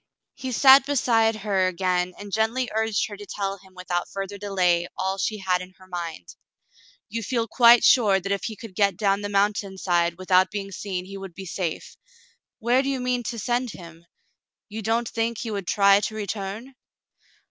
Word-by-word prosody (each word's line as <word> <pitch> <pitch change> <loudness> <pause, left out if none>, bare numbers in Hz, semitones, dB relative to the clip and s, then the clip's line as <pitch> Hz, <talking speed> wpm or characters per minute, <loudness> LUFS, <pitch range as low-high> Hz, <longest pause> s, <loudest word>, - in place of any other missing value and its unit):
He 260 -1 -6
sat 265 +3 +7
beside 230 -5 +2
her 195 -3 0
again 180 0 -1
and 205 -1 -10
gently 230 +3 0
urged 220 -1 0
her 205 - -8
to 205 0 -10
tell 195 -1 -3
him 190 0 -20
without 180 -1 -3
further 195 +1 -6
delay 180 -4 +1
all 190 +1 -2
she 215 +3 -1
had 185 -2 0
in 185 +1 -11
her 185 - -17
mind. 170 - -6 0.8
"You 230 +2 -4
feel 230 +1 -1
quite 235 +1 +6
sure 205 -6 +5
that 195 +2 -5
if 200 - -1
he 220 - -4
could 220 -1 -11
get 200 -2 +1
down 200 -1 +1
the 205 - -4
mountain 200 -1 0
side 170 -2 +1
without 185 0 +3
being 195 -1 -5
seen, 185 -1 -5
he 195 +1 -8
would 190 -3 -9
be 195 - -8
safe; 170 -2 -4 0.6
where 240 +3 +2
do 275 - -2
you 270 -1 -1
mean 250 0 -1
to 235 - -4
send 240 +1 -1
him? 170 -1 -13 0.6
You 215 +2 -6
don't 225 +2 0
think 230 +1 -2
he 230 - -4
would 200 -3 -4
try 200 -1 +5
to 215 +1 -4
return 210 +4 -5
200 Hz, 190 wpm, -24 LUFS, 185-225 Hz, 0.8 s, sat